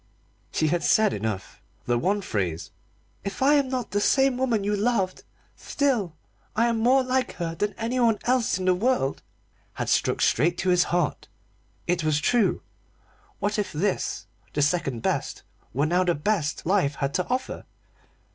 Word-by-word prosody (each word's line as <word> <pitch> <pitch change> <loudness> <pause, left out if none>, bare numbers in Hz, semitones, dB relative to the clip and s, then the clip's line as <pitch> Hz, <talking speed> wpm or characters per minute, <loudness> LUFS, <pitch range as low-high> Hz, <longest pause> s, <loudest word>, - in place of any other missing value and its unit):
She 155 - +1
had 175 +2 +1
said 215 -2 +4
enough. 105 -2 -4 0.2
The 120 - +1
one 200 +9 +1
phrase 90 - -3 0.5
"If 200 +6 -3
I 285 +2 +5
am 280 -3 +3
not 255 -5 -3
the 205 +1 0
same 270 +3 +3
woman 245 -5 0
you 205 +1 0
loved, 205 -3 0 0.3
still 240 - -1 0.4
I 230 +2 +3
am 230 -1 +1
more 255 +4 +4
like 255 0 0
her 170 -2 -4
than 205 +5 -2
anyone 235 -1 +1
else 245 -5 +1
in 185 - -4
the 185 - +4
world" 185 - 0 0.5
had - - -3
struck - - +1
straight 170 +3 +2
at - - -1
his 180 0 +4
heart. 175 -4 -1 0.6
It 175 -1 0
was 155 -1 +2
true. 225 +5 +1 0.7
What 205 +1 -1
if 205 -2 -2
this, 185 +6 -1 0.3
the 145 - +1
second 140 -7 0
best, - - -2 0.3
were 140 +5 +1
now 175 +4 +2
the 175 -2 +1
best 160 -1 -1
life 175 -6 +2
had 140 0 -2
to 180 - -1
offer? 255 +1 -3
195 Hz, 165 wpm, -25 LUFS, 160-240 Hz, 0.7 s, I